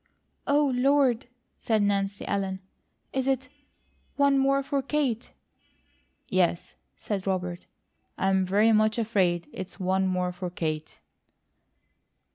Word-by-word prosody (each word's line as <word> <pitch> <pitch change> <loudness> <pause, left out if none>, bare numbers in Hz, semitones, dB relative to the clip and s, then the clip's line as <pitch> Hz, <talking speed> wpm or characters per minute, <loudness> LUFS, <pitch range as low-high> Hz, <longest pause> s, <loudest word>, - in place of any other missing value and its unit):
"Oh, 285 -1 +3
Lord!" 255 -2 +3 0.3
said 220 -2 +1
Nancy 200 0 0
Ellen. 195 -1 -2 0.5
"Is 265 0 -1
it 265 -1 0 0.7
one 280 -1 +4
more 275 0 +3
for 280 0 -1
Kate?" 265 -5 -1 1.0
"Yes," 175 -2 0 0.2
said 200 -2 -4
Robert, 180 -2 -2 0.5
"I 195 - +1
am 190 0 +3
very 205 +4 +3
much 215 0 +3
afraid 185 -7 +1
it's 190 +1 -7
'one 190 +1 +1
more 180 -1 0
for 180 0 -5
Kate.'" 155 -3 -4
200 Hz, 115 wpm, -27 LUFS, 185-260 Hz, 1.0 s, one